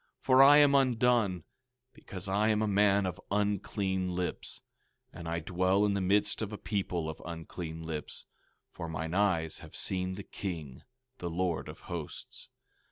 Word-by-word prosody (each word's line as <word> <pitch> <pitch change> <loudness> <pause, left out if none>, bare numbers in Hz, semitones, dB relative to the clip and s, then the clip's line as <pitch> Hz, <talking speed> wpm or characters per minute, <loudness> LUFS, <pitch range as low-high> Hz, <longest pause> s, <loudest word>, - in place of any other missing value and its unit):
for 130 0 +5
I 145 +2 +9
am 145 -1 +6
undone; 120 - +3 0.5
because 95 +1 -6
I 100 +3 +2
am 110 0 +2
a - - +1
man 100 -1 +3
of 95 0 -4
unclean 100 -2 -1
lips; 90 -1 -3 0.5
and 85 -1 -8
I 85 0 -1
dwell 95 +4 +2
in 100 - +2
the 100 - 0
midst 100 +4 +2
of 110 -1 -3
a 105 - -5
people 95 -5 -2
of 80 - -6
unclean 80 0 -6
lips; 80 -2 -5 0.5
for 85 - -6
mine 80 +1 -4
eyes 90 -5 +1
have - - -12
seen 95 0 -1
the 100 - -7
King, 80 -12 -6 0.4
the 85 - -3
Lord 85 -1 -1
of - - -10
Hosts. - - -7
95 Hz, 165 wpm, -31 LUFS, 85-105 Hz, 0.5 s, I